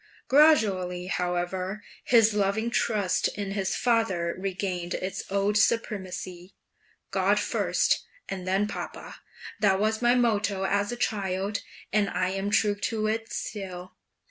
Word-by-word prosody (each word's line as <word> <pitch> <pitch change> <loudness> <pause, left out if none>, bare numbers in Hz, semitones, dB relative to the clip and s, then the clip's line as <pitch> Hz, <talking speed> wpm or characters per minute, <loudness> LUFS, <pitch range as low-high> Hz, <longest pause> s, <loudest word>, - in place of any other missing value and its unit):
Gradually, 200 - +4
however, 185 +2 -2 0.2
his 225 -3 +5
loving 210 +3 0
trust 205 -6 +1
in 200 -1 -3
his 195 -1 -1
father 190 -8 +1
regained 185 -2 -3
its 185 +1 -4
old 200 +2 +2
supremacy. 185 -5 -2 0.6
"'God - - +2
first, - - +1 0.2
and 185 -1 -5
then 195 +2 +2
papa'; - - -7 0.4
that 195 -2 +3
was 220 +2 0
my 240 0 +4
motto 210 -5 +1
as 200 +3 +1
a - - -3
child, 200 -2 -1 0.3
and 205 -2 +3
I 180 - 0
am 195 +1 -2
true 210 0 +3
to 215 +1 -2
it 225 +1 -2
still." 185 -3 -6
200 Hz, 130 wpm, -27 LUFS, 185-215 Hz, 0.6 s, his